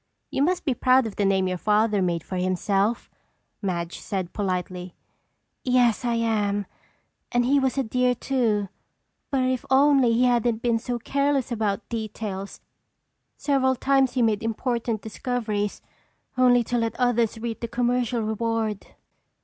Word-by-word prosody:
"You -, -, -1 dB
must 360 Hz, +5 st, +1 dB
be 270 Hz, -, +2 dB
proud 255 Hz, 0 st, +3 dB
of 220 Hz, -, -5 dB
the 205 Hz, -, +1 dB
name 190 Hz, -1 st, +2 dB
your 185 Hz, -1 st, -2 dB
father 210 Hz, 0 st, +2 dB
made 170 Hz, -3 st, 0 dB
for 185 Hz, -, -5 dB
himself," 195 Hz, +4 st, 0 dB, 0.5 s
Madge 175 Hz, -4 st, -3 dB
said 190 Hz, -4 st, -4 dB
politely. 180 Hz, -2 st, -3 dB, 0.7 s
"Yes, 250 Hz, -2 st, +3 dB
I 240 Hz, -1 st, 0 dB
am, 210 Hz, -3 st, 0 dB, 0.7 s
and 245 Hz, 0 st, +2 dB
he 280 Hz, +3 st, +4 dB
was 265 Hz, 0 st, 0 dB
a 270 Hz, -, +2 dB
dear, 250 Hz, +2 st, +1 dB
too. 230 Hz, -6 st, 0 dB, 0.6 s
But 270 Hz, -2 st, +1 dB
if 255 Hz, -1 st, 0 dB
only 270 Hz, -2 st, +5 dB
he 240 Hz, +2 st, +3 dB
hadn't 240 Hz, -2 st, +2 dB
been 235 Hz, -2 st, +2 dB
so 245 Hz, +1 st, -3 dB
careless 280 Hz, +1 st, 0 dB
about 215 Hz, -2 st, -1 dB
details! 215 Hz, -3 st, -5 dB, 0.8 s
Several 260 Hz, -2 st, +2 dB
times 270 Hz, 0 st, +2 dB
he 250 Hz, -, +2 dB
made 215 Hz, -2 st, +1 dB
important 230 Hz, -1 st, -2 dB
discoveries, 220 Hz, -3 st, -3 dB, 0.5 s
only 250 Hz, -1 st, +5 dB
to 240 Hz, +1 st, -1 dB
let 230 Hz, 0 st, -1 dB
others 240 Hz, -3 st, +2 dB
reap 225 Hz, 0 st, -4 dB
the 235 Hz, -, -4 dB
commercial 245 Hz, -1 st, 0 dB
reward. 220 Hz, -1 st, -2 dB
230 Hz, 150 wpm, -25 LUFS, 205-250 Hz, 0.8 s, only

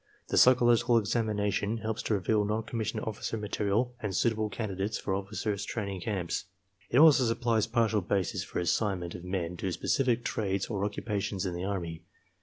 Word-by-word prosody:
The -, -, 0 dB
psychological 120 Hz, -1 st, +5 dB
examina 105 Hz, -2 st, 0 dB
tion 105 Hz, +3 st, -1 dB
helps 110 Hz, 0 st, -3 dB
to 110 Hz, -, 0 dB
reveal 105 Hz, +2 st, +1 dB
non 105 Hz, +2 st, -1 dB
commissioned 110 Hz, -1 st, -3 dB
officer 110 Hz, +1 st, -3 dB
material 105 Hz, +3 st, 0 dB
and 105 Hz, -5 st, -3 dB
suitable 110 Hz, -2 st, +1 dB
candidates 100 Hz, -1 st, -3 dB
for 95 Hz, -, -3 dB
officers' 100 Hz, +1 st, -2 dB
training 100 Hz, -5 st, -4 dB
camps. 95 Hz, -3 st, -2 dB, 0.4 s
It 120 Hz, -, +1 dB
also 150 Hz, -3 st, +7 dB
supplies 115 Hz, -1 st, +1 dB
partial 115 Hz, -2 st, +2 dB
basis 95 Hz, 0 st, -1 dB
for -, -, -7 dB
assignment 90 Hz, 0 st, 0 dB
of 85 Hz, -, -8 dB
men 90 Hz, -2 st, -3 dB
to 95 Hz, +2 st, -2 dB
specific 120 Hz, +5 st, +1 dB
trades 100 Hz, -3 st, -1 dB
or 100 Hz, -2 st, -1 dB
occu 105 Hz, -, -8 dB
pations 100 Hz, -3 st, -2 dB
in 90 Hz, -, -2 dB
the 90 Hz, +2 st, -3 dB
Army. 85 Hz, -5 st, -3 dB
105 Hz, 175 wpm, -30 LUFS, 95-115 Hz, 0.4 s, also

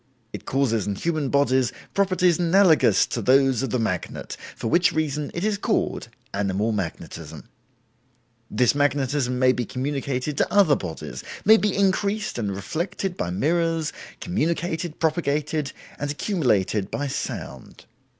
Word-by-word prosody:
It -, -, -7 dB
causes 120 Hz, -7 st, +1 dB
in 100 Hz, -, -1 dB
human 155 Hz, -, -1 dB
bodies 130 Hz, -3 st, +2 dB, 0.2 s
properties 185 Hz, -3 st, +2 dB
analogous 175 Hz, -1 st, +4 dB
to 120 Hz, -, -3 dB
those 130 Hz, +1 st, +4 dB
of 135 Hz, -, -2 dB
the 125 Hz, -, 0 dB
magnet, 95 Hz, -7 st, -3 dB, 0.2 s
for -, -, -4 dB
which 175 Hz, +9 st, +4 dB
reason 150 Hz, -2 st, -1 dB
it 170 Hz, -, -2 dB
is 210 Hz, -1 st, 0 dB
called -, -, -1 dB, 0.3 s
'Animal 100 Hz, +2 st, 0 dB
Magnetism'. 100 Hz, -6 st, -6 dB, 1.0 s
This 125 Hz, -2 st, +3 dB
magnetism 140 Hz, -2 st, 0 dB
may 130 Hz, 0 st, +5 dB
be 125 Hz, -, -1 dB
communicated 135 Hz, +2 st, -3 dB
to -, -, +1 dB
other 195 Hz, -8 st, +5 dB
bodies, 85 Hz, -8 st, -6 dB, 0.2 s
may 220 Hz, +2 st, +8 dB
be 210 Hz, -3 st, 0 dB
increased 200 Hz, -, 0 dB
and 100 Hz, -4 st, -2 dB
reflected 175 Hz, -, -3 dB
by 85 Hz, -, -3 dB
mirrors, 165 Hz, -, 0 dB, 0.3 s
communicated, 170 Hz, -1 st, -2 dB
propagated, 155 Hz, -2 st, 0 dB, 0.3 s
and 145 Hz, -, -2 dB
accumulated, 120 Hz, -, 0 dB
by 145 Hz, -, -3 dB
sound. 135 Hz, -, -6 dB
145 Hz, 135 wpm, -24 LUFS, 125-170 Hz, 1.0 s, may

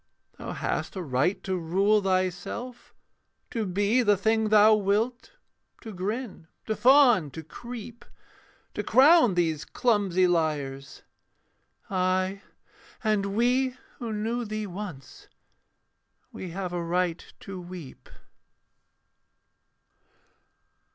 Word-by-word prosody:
Thou -, -, -6 dB
hast -, -, -3 dB
a 190 Hz, -, -3 dB
right 140 Hz, +6 st, 0 dB
to 190 Hz, -, -2 dB
rule 195 Hz, +5 st, +2 dB
thyself; 195 Hz, +6 st, -3 dB, 0.6 s
to 225 Hz, -3 st, -2 dB
be 205 Hz, +6 st, +2 dB
The 205 Hz, -4 st, +3 dB
thing 220 Hz, +2 st, +1 dB
thou 215 Hz, 0 st, +7 dB
wilt; 215 Hz, +4 st, 0 dB, 0.5 s
to 220 Hz, -3 st, -8 dB
grin, 200 Hz, -1 st, -5 dB, 0.2 s
to 220 Hz, -, -1 dB
fawn, 245 Hz, -, +5 dB
to 160 Hz, +4 st, -9 dB
creep: 235 Hz, +7 st, -9 dB, 0.7 s
To -, -, -2 dB
crown 275 Hz, -, +5 dB
these 165 Hz, -3 st, 0 dB
clumsy 200 Hz, -5 st, +1 dB
liars; 150 Hz, -6 st, -2 dB, 0.9 s
ay, 185 Hz, +1 st, 0 dB, 0.6 s
and 200 Hz, -2 st, 0 dB
we 250 Hz, +3 st, +1 dB, 0.2 s
Who 235 Hz, -2 st, -4 dB
knew 225 Hz, +3 st, -2 dB
thee 215 Hz, -1 st, -4 dB
once, 185 Hz, -8 st, -9 dB, 1.0 s
we 185 Hz, -, -7 dB
have 180 Hz, +1 st, -5 dB
a 175 Hz, -, -2 dB
right 175 Hz, 0 st, -1 dB, 0.2 s
to 190 Hz, -2 st, -7 dB
weep. 175 Hz, -6 st, -11 dB
200 Hz, 105 wpm, -27 LUFS, 180-225 Hz, 1.0 s, thou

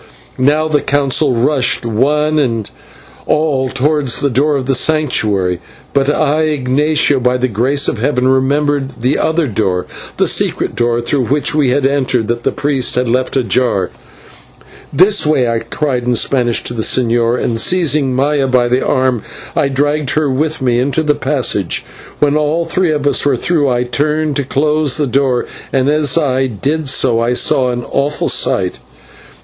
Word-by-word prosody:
Now 150 Hz, +4 st, +2 dB
the 150 Hz, -2 st, +1 dB
Council 140 Hz, -1 st, +1 dB
rushed 125 Hz, 0 st, +1 dB
one 150 Hz, +7 st, +1 dB
and 115 Hz, -7 st, -1 dB, 0.6 s
all 145 Hz, -4 st, +1 dB
towards 140 Hz, -1 st, 0 dB
the 140 Hz, -, 0 dB
door 145 Hz, +5 st, +1 dB
of 135 Hz, -2 st, -2 dB
the 135 Hz, -, +1 dB
Sanctuary; 110 Hz, -, 0 dB, 0.3 s
but 140 Hz, 0 st, +1 dB
I, 150 Hz, +1 st, +1 dB
Ignatio, 145 Hz, 0 st, +1 dB
by 125 Hz, 0 st, +1 dB
the 125 Hz, 0 st, 0 dB
grace 130 Hz, +6 st, +1 dB
of 115 Hz, -, -2 dB
Heaven, 125 Hz, +1 st, 0 dB
remembered 135 Hz, 0 st, 0 dB
the 130 Hz, +4 st, +1 dB
outer 160 Hz, 0 st, +1 dB
door, 100 Hz, -6 st, -1 dB, 0.3 s
the -, -, +2 dB
secret -, -, 0 dB
door 120 Hz, 0 st, 0 dB
through 125 Hz, +2 st, -1 dB
which 145 Hz, +2 st, 0 dB
we 150 Hz, -4 st, +2 dB
had 135 Hz, +2 st, +1 dB
entered, 130 Hz, -5 st, 0 dB
that 120 Hz, 0 st, -1 dB
the -, -, 0 dB
priest 140 Hz, -3 st, -1 dB
had 125 Hz, 0 st, 0 dB
left 130 Hz, +3 st, 0 dB
ajar. 120 Hz, -4 st, 0 dB, 1.0 s
"This 200 Hz, +4 st, +3 dB
way!" 150 Hz, -5 st, +2 dB
I 115 Hz, -1 st, 0 dB
cried 125 Hz, +2 st, -3 dB
in 125 Hz, 0 st, +1 dB
Spanish 120 Hz, 0 st, 0 dB
to -, -, -4 dB
the 115 Hz, -, -3 dB
señor, 120 Hz, 0 st, +1 dB
and 115 Hz, -1 st, -1 dB
seizing 150 Hz, -7 st, +1 dB
Maya 140 Hz, +1 st, +1 dB
by 125 Hz, -2 st, +2 dB
the 125 Hz, +2 st, +1 dB
arm 130 Hz, -3 st, 0 dB, 0.3 s
I -, -, +2 dB
dragged 145 Hz, +1 st, -1 dB
her 155 Hz, -3 st, +1 dB
with 150 Hz, +2 st, -2 dB
me 120 Hz, -2 st, +1 dB
into 140 Hz, +5 st, 0 dB
the 150 Hz, -1 st, +2 dB
passage. -, -, -1 dB, 0.3 s
When 145 Hz, 0 st, +1 dB
all 155 Hz, +2 st, 0 dB
three 175 Hz, 0 st, 0 dB
of 145 Hz, -2 st, -2 dB
us 145 Hz, -, +2 dB
were 145 Hz, -, +1 dB
through 155 Hz, -6 st, 0 dB
I 125 Hz, -1 st, 0 dB
turned 150 Hz, +4 st, -1 dB
to 140 Hz, -, 0 dB
close 150 Hz, 0 st, 0 dB
the 150 Hz, -, 0 dB
door, 130 Hz, -2 st, 0 dB, 0.3 s
and 135 Hz, +1 st, +1 dB
as 150 Hz, -1 st, +2 dB
I 135 Hz, -4 st, +1 dB
did 140 Hz, +7 st, -2 dB
so 120 Hz, -3 st, +2 dB
I 120 Hz, +1 st, 0 dB
saw 125 Hz, +1 st, +2 dB
an 120 Hz, 0 st, -3 dB
awful 145 Hz, +2 st, -1 dB
sight. -, -, 0 dB
135 Hz, 175 wpm, -14 LUFS, 125-150 Hz, 1.0 s, This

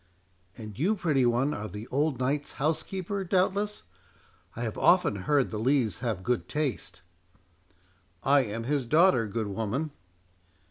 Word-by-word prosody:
"And 105 Hz, -1 st, -9 dB
you, 195 Hz, +9 st, +2 dB
pretty 150 Hz, -10 st, +2 dB
one, 125 Hz, +5 st, +1 dB
are 105 Hz, +1 st, -4 dB
the 105 Hz, +4 st, -8 dB
old 145 Hz, +1 st, 0 dB
knight's 140 Hz, +3 st, -1 dB
house 155 Hz, +3 st, 0 dB
keeper, 195 Hz, +3 st, -4 dB
doubtless? 195 Hz, +3 st, 0 dB, 0.7 s
I 120 Hz, -, -4 dB
have 110 Hz, -3 st, -3 dB
often 180 Hz, -, +4 dB
heard 135 Hz, +8 st, +1 dB
the 105 Hz, -, -3 dB
Lees 120 Hz, -5 st, +1 dB
have 110 Hz, -6 st, -2 dB
good 125 Hz, +2 st, -1 dB
taste." 115 Hz, -, -3 dB, 1.2 s
"I 140 Hz, +1 st, +5 dB
am 115 Hz, -1 st, -4 dB
his 135 Hz, 0 st, -1 dB
daughter, 155 Hz, -, +4 dB
good 110 Hz, +2 st, -2 dB
woman." 115 Hz, +9 st, -2 dB
135 Hz, 145 wpm, -28 LUFS, 110-155 Hz, 1.2 s, I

